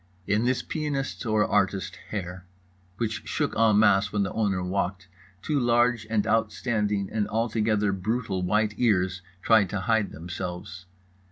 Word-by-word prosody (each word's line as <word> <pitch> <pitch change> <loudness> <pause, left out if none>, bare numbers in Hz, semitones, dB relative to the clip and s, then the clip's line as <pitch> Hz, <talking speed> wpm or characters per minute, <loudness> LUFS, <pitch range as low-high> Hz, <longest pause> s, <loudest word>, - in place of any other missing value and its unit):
In 105 +3 +1
this 130 0 +1
pianist's 145 -5 -3
or 110 -1 +3
artist's 95 -2 0
hair, 90 -3 -5 0.5
which 115 -1 -2
shook - - -1
en 110 -2 +4
masse 105 -1 +4
when 105 -1 +1
the 95 - -3
owner 100 -4 0
walked, 95 0 -2 0.4
two 150 +4 0
large 120 -2 +2
and 110 -2 +1
outstanding 105 -2 0
and 105 -2 0
altogether 110 -2 +1
brutal 100 0 -2
white 105 +3 +1
ears 95 -5 +1 0.2
tried 110 -5 +4
to 100 0 -3
hide 110 -1 +1
themselves. 90 +2 -7
105 Hz, 145 wpm, -26 LUFS, 95-115 Hz, 0.5 s, en